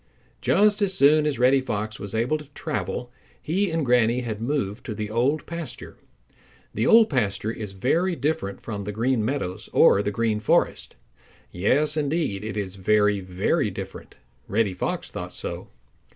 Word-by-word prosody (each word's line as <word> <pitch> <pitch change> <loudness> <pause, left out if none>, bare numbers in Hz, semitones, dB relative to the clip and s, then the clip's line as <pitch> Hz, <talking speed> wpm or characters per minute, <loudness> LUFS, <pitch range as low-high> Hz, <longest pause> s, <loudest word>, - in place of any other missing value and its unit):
Just 210 +1 +3
as 195 -2 +1
soon 150 0 +5
as 145 - -1
Reddy 130 +2 +4
Fox 110 -3 -4
was 100 +2 -6
able 125 +8 +1
to 150 -2 -13
travel 105 +5 -4 0.3
he 190 +6 0
and 160 -2 -1
Granny 120 0 +3
had 110 -3 -5
moved 120 -4 -2
to 110 - -4
the 105 0 -4
Old 130 +7 +1
Pasture. 165 -6 -7 0.8
The 110 - 0
Old 225 -1 +7
Pasture 110 -5 -1
is 105 -4 -7
very 165 - +1
different 135 - -2
from 100 -3 -5
the 105 - -3
Green 115 +2 0
Meadows 110 -7 -3
or 100 - +6
the 105 - -1
Green 110 0 0
Forest. - - +1 0.6
Yes, 135 +13 +1
indeed, 145 - -1
it 110 -1 -5
is 100 -1 -4
very, 105 +1 +3
very 95 0 0
different. - - -8 0.3
Reddy 105 -2 +1
Fox 90 - -3
thought - - -7
so. - - -5
115 Hz, 165 wpm, -24 LUFS, 105-150 Hz, 0.8 s, Old